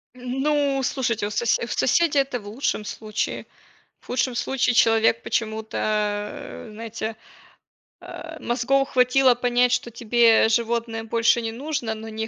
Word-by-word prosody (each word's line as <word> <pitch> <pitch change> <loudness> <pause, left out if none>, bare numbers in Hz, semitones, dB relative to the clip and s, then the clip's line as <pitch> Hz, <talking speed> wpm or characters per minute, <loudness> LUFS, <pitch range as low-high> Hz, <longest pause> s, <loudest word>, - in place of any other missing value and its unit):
М, 250 +1 -4
ну, 285 -2 +1
слушайте, 235 -5 -1
у - - -5
сосе 220 +3 0
у - - -10
соседей 290 +4 +2
это 270 -2 -1
в 205 - -13
лучшем 215 -1 -2
случае. 215 0 -4 0.6
В - - -24
худшем 250 0 -1
случае 245 0 0
человек 225 0 +4
почему-то, 220 -1 -3
э, 210 +1 -3
знаете, 225 0 -5 0.9
а, 320 -1 -9
мозгов 265 +3 0
хватило 250 0 +4
понять, 245 0 +2
что 240 - 0
тебе 230 -1 +4
животное 230 0 -1
больше 230 +1 +2
не 225 -1 -3
нужно, 270 -2 -3
но 220 +1 -8
не 220 0 -4
235 Hz, 145 wpm, -23 LUFS, 220-255 Hz, 0.9 s, человек